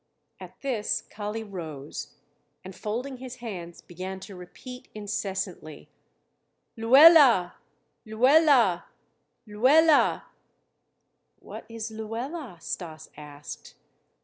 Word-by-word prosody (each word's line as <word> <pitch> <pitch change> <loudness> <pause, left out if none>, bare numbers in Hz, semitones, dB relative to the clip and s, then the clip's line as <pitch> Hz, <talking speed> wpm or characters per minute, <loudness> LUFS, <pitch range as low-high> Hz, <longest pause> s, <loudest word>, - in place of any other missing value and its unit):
At - - -12
this 240 -6 -2
Kali 210 +1 -5
rose 160 -8 -8 0.5
and 190 0 -10
folding 250 +5 -5
his 255 0 -9
hands 185 -9 -8
began 185 +2 -7
to 195 +1 -10
repeat 250 +8 -11
incessantly: 195 -6 -5 0.9
"Luela! 255 - +7 0.5
Luela! 245 - +4 0.6
Luela!" 285 +9 +4 1.1
"What - - -11
is 230 0 -6
'Luela'?" 225 - -6
Stas 160 -3 -7
asked. 145 -1 -11
215 Hz, 85 wpm, -26 LUFS, 180-255 Hz, 1.1 s, Luela